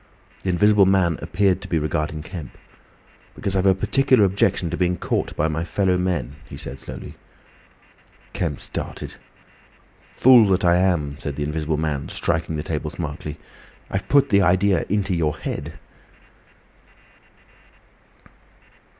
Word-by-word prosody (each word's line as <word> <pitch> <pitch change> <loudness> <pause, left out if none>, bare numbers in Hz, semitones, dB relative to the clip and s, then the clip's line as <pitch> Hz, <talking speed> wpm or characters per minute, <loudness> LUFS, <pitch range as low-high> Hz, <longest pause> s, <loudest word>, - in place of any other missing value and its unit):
The 95 - -3
Invisible 100 +2 +4
Man 95 -4 +2
appeared 95 +1 +1
to - - -8
be 85 - 0
regarding 75 0 -2
Kemp. 80 -5 -9 0.8
"Because 95 -1 -3
I've 95 0 +2
a 95 - +5
particular 130 +3 +3
objection 95 -3 +1
to - - -1
being 90 0 0
caught - - -2
by 75 - +1
my 80 +1 -2
fellow 90 +2 +1
men," 85 -7 -2
he - - -8
said 65 - -8
slowly. 65 - -9 1.2
Kemp - - -3
started. - - -6 1.0
"Fool 125 -4 +7
that 95 -1 +2
I 85 0 +5
am!" 80 -6 0
said 70 - -5
the 75 - -3
Invisible 75 +1 -2
Man, 75 -3 -2
striking 80 -1 -1
the 75 - -3
table 75 -1 -3
smartly. 75 -1 -6 0.5
"I've 95 - -3
put 140 -1 +4
the 100 -1 +4
idea 95 +1 +3
into 100 -1 0
your 80 -2 0
head." - - -5
85 Hz, 140 wpm, -22 LUFS, 75-95 Hz, 1.2 s, Fool